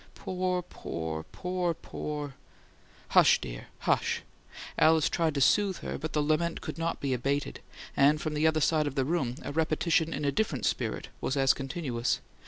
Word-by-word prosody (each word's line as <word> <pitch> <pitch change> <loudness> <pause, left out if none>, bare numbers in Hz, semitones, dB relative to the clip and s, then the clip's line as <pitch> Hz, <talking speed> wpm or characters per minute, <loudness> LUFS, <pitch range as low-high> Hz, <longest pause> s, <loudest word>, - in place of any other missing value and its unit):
Poor, 180 -1 -1
poor, 80 - -5
poor, 180 -2 -2
POOR 150 -3 -5 0.4
" - - -28
"Hush, - - +6
dear, - - -7
hush!" - - +1 0.5
Alice 160 -1 +5
tried 160 -3 0
to 140 - 0
soothe 195 +7 +4
her, - - -4
but 160 +2 -4
the 150 - +2
lament 155 +3 +1
could - - -6
not 165 0 -1
be 140 -2 0
abated, 140 +3 -1 0.4
and 145 +2 +5
from 155 -1 -3
the 150 +1 +3
other 155 0 +2
side 155 0 +3
of 140 - -4
the 135 -2 +1
room 135 -6 0
a - - -4
repetition 160 +1 +1
in 145 - -2
a 140 - +2
different 145 - -1
spirit - - -1
was 135 - -1
as 135 -1 +5
continuous. 135 -4 -2
150 Hz, 180 wpm, -29 LUFS, 135-165 Hz, 0.5 s, Hush